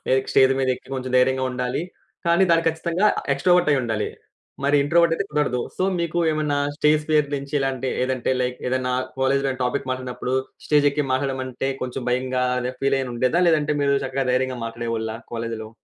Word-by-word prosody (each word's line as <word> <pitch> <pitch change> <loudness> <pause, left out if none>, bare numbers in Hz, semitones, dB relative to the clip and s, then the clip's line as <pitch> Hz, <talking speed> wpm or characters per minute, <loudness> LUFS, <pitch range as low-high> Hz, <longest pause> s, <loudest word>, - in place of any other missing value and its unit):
ఏక్ 130 - 0
stage 130 0 +5
మీదెక్కి, 130 0 -1
కొంచెం 130 -1 -4
ధైర్యంగా 130 +1 +3
ఉండాలి. 125 +4 -2 0.5
కానీ, 170 +3 +5
దాని 165 0 +3
ఖచ్చితంగా 170 +4 0 0.3
ఎక్స్‌ట్రోవర్టయ్యిండాలి. 140 -9 +2 0.6
మరి 145 +1 +4
ఇంట్రోవర్టయితే 170 +4 +3
కుదరదు. 145 -5 0 0.2
సో, - - -1 0.2
మీకు 170 0 -1
ఏమన్నా 150 -2 0 0.2
స్టేజ్ 150 0 +3
ఫియర్ 150 -2 +3
నుంచి 140 +1 -7
ఇలాంటి 135 -1 -1
ఏదంటే, 130 -1 -1
లైక్ 125 0 -2
ఏదన్నా 125 -1 0 0.3
కాలేజీలో 135 +1 +2
ఏమన్నా 130 0 -4
టాపిక్ 130 +1 -2
మాట్టాడినప్పుడూ, 130 0 -3 0.3
స్టేజెక్కి 145 -1 +3
మాట్లాడమంటే, 130 -1 -2
కొంచెం 130 0 -4
భయంగా, 130 0 0 0.2
అదా 125 +1 -2
ఫీలేయనుండేదా? 135 +3 +1
లేదంటే, 150 -2 +2
మీరు 140 0 +3
చక్కగా 135 0 -2
ధైర్యంగా 130 0 0
మాట్లాడేవాళ్ళ 115 -1 -3 0.2
కాలేజులో? 115 -1 -4
130 Hz, 150 wpm, -23 LUFS, 125-150 Hz, 0.6 s, స్టేజ్